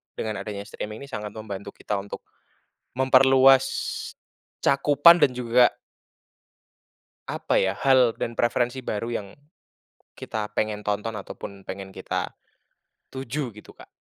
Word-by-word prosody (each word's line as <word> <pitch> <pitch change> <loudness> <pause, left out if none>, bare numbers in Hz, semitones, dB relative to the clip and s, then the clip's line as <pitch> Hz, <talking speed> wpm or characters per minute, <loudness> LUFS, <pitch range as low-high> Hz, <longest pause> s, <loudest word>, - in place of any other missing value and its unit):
dengan 110 -2 -3
adanya 100 0 -5
streaming 105 +4 -7
ini - - -9
sangat 105 -2 -5
membantu 100 -2 -7
kita 105 - -3
untuk 100 +1 -8 0.7
memperluas 130 0 +6 1.0
cakupan 145 +5 +6
dan 125 -2 +3
juga 125 0 +3 1.5
apa - - 0
ya, 95 0 +2
hal 130 -1 +4
dan 115 0 -3
preferensi 120 +2 0
baru 110 +2 -3
yang 105 -4 -3 0.9
kita 105 -1 -5
pengen 105 -1 -2
tonton 105 +2 -2
ataupun 100 0 -9
pengen 95 0 -7
kita 95 - -4 0.7
tuju, 130 -2 -5
gitu 105 - -13
Kak. - - -16
115 Hz, 120 wpm, -25 LUFS, 105-130 Hz, 1.5 s, memperluas